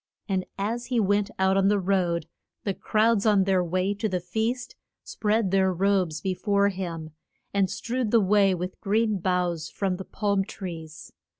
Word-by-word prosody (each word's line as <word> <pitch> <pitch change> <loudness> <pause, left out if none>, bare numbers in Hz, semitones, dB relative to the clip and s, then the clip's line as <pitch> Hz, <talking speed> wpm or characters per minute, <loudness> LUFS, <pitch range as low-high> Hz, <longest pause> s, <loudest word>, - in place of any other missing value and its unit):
And 190 -2 -1
as 225 +5 -2
he 250 -2 +1
went 205 0 +2
out 190 0 +3
on 195 0 +3
the 205 +1 +3
road 180 -3 0 0.4
the 200 - -1
crowds 220 +1 +2
on 205 -2 +5
their 190 -1 +2
way 185 +3 0
to 205 +2 -2
the 185 -1 -1
feast 220 +8 -2 0.3
spread 215 -2 0
their 190 -1 +3
robes 185 -4 +1
be 190 - -1
fore 200 +2 +2
him, 170 -5 -5 0.4
and 195 -2 +2
strewed 245 -1 -2
the 230 - +5
way 200 -1 +4
with 180 +1 -6
green 215 0 +1
boughs 175 -3 -1
from 190 -3 -2
the 190 - -7
palm 200 -2 0
trees. 165 -6 -8
195 Hz, 175 wpm, -26 LUFS, 180-210 Hz, 0.4 s, on